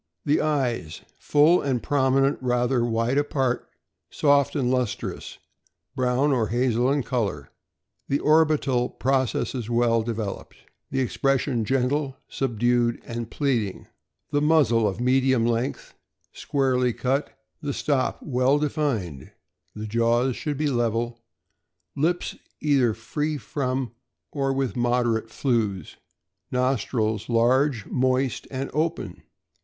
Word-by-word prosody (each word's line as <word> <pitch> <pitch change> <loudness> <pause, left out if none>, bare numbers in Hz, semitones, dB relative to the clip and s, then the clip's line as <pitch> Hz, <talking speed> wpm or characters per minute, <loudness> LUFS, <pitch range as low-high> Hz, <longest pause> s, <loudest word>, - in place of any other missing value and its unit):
The 145 +1 +2
eyes 125 - -1 0.2
full 150 +4 +4
and 130 -4 -1
prominent, 135 0 +2
rather 125 0 +1
wide 120 +3 +1
apart, 135 -4 -1 0.4
soft 140 -1 +2
and 130 -4 +1
lustrous, 125 -4 -3 0.6
brown 130 +2 +1
or 120 -5 +1
hazel 120 +2 +1
in 140 -1 +1
color. 100 - -2 0.6
The 140 - +1
orbital 150 -5 +2
processes 130 -2 -1
well 115 -1 +2
developed. 110 -3 -5 0.3
The 135 - -1
expression 130 0 0
gentle, 135 +2 0
subdued, 120 -1 0
and 115 -1 -5
pleading. 120 -10 -1 0.4
The 145 -1 +1
muzzle 140 -8 +3
of 100 +2 -3
medium 130 -1 +2
length, 120 +3 -2 0.4
squarely 130 -3 0
cut, 135 +4 -2 0.2
the 145 - -2
stop 140 -1 -1
well 130 0 +2
defined. 135 - -2 0.5
The 105 0 -5
jaws 115 +3 +1
should 150 -3 -3
be 155 - -1
level. 120 -3 0 0.8
Lips 170 +5 0 0.2
either 135 -7 +2
free 150 +7 -3
from 130 0 -3 0.4
or 135 -2 0
with 135 -2 -1
moderate 120 -2 +1
flews. 110 - -1 0.5
Nostrils 120 -4 0
large, 120 +1 +2
moist, 130 -1 0
and 135 0 -4
open. 155 +2 -2
125 Hz, 115 wpm, -25 LUFS, 115-140 Hz, 0.8 s, full